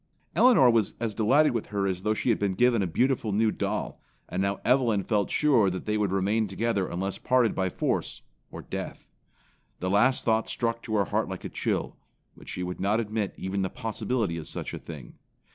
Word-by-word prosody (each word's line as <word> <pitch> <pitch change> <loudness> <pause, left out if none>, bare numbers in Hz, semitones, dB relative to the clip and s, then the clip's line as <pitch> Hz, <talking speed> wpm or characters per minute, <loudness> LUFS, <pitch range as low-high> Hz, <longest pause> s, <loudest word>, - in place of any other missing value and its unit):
Elinor 245 - +6
was 115 -3 +1
as 115 -2 -2
delighted 140 +9 +4
with 115 -3 -3
her 100 -2 -1
as 95 -2 -1
though 110 +2 0
she 125 - -1
had 115 - +2
been 100 -2 0
given 120 +1 +3
a 95 - 0
beautiful 120 +4 +1
new 110 +2 +2
doll; - - -3 0.3
and 90 - -2
now 100 0 -1
Evelyn 120 -6 +3
felt 105 -2 0
sure 130 -10 +3
that 95 0 -5
they 105 - 0
would 105 -3 0
remain 100 +3 +1
together 100 0 -1
unless 95 +2 -3
parted 125 -3 +2
by 95 -1 0
force - - -2 0.3
or - - -9
death. - - -6 0.7
The 90 +1 -2
last 125 +6 +3
thought 110 -1 +1
struck 115 -1 -1
to 110 - -3
her 100 -2 +2
heart - - -1
like - - -6
a - - -3
chill, - - -2 0.4
but - - -13
she 90 - -4
would 90 0 -5
not 100 +4 +1
admit 110 -2 -2
even 95 +1 -2
the 95 - -1
possibility 110 -4 -2
of 80 - -6
such - - -5
a - - -5
thing. 75 -7 -11
105 Hz, 210 wpm, -27 LUFS, 95-115 Hz, 0.7 s, Elinor